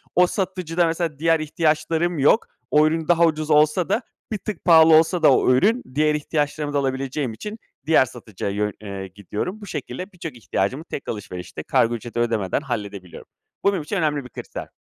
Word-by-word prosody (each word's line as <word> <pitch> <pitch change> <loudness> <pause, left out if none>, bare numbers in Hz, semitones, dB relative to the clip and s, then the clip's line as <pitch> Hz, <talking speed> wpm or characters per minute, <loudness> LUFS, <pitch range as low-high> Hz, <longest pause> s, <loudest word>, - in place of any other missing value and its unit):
o 180 0 +6
satıcıda 180 -3 -1
mesela 165 -3 -2
diğer 165 0 +3
ihtiyaçlarım 160 +1 0
yok. 145 +11 +4 0.2
O 150 +1 +5
ürün 160 0 -1
daha 170 -1 +5
ucuz 155 -1 -1
olsa 150 +4 +3
da 220 +5 +1 0.3
bir 215 - -1
tık 210 -3 -6
pahalı 160 -2 +7
olsa 165 +1 +3
da 140 - +7
o 130 - +4
ürün, 220 - +3
diğer 150 0 +3
ihtiyaçlarımı 150 0 -2
da - - +1
alabileceğim 135 -1 -2
için 210 - -7 0.3
diğer 155 -4 +5
satıcıya 110 -5 -6
yön 105 0 -1
eee, 100 -2 -6
gidiyorum. 105 - -5
Bu - - -8
şekilde 185 +2 -6
birçok 165 -7 -7
ihtiyacımı 115 +6 -2
tek 145 - -7
alışverişte 90 -4 -6
kargo 120 +1 +2
ücreti 120 +1 -6
ödemeden 115 -6 0
halledebiliyorum. 100 -7 -6 0.4
Bu 200 - +4
benim 180 -6 -2
için 180 +7 -4
önemli 150 -5 0
bir 125 - -10
kriter. - - -8
150 Hz, 180 wpm, -22 LUFS, 120-170 Hz, 0.4 s, pahalı